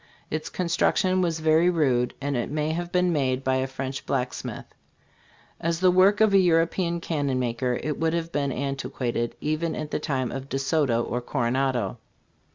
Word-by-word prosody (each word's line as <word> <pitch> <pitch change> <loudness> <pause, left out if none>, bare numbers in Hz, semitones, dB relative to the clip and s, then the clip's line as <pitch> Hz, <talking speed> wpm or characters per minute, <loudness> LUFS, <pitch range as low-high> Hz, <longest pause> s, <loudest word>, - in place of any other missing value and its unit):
Its 155 0 -3
construc 170 -2 +1
tion 185 0 +2
was 165 -2 0
very 160 +2 +4
rude, 130 -8 +1
and 140 0 -2
it 120 - -1
may 150 +1 -1
have 175 +2 -3
been 180 -1 +2
made 135 -3 0
by 130 0 +1
a 130 0 0
French 135 0 -5
blacksmith. 130 -2 -3 0.9
As 165 0 -1
the 185 0 +5
work 195 +4 +4
of 215 -2 +5
a 195 - +7
European 170 0 +2
cannon 140 -6 -1
m 120 -1 -1
iker, 125 +1 -1
it 150 -2 -2
would 160 0 +1
have 170 0 -3
been 140 -3 0
antiquated 125 -3 -2
even 155 +2 -1
in 155 -1 -4
the - - -2
time 130 -4 -2
of 135 0 -6
De 135 - -1
Soto 135 -4 +1
or 125 +1 -3
Coronado. 125 -3 -1
145 Hz, 185 wpm, -25 LUFS, 130-170 Hz, 0.9 s, a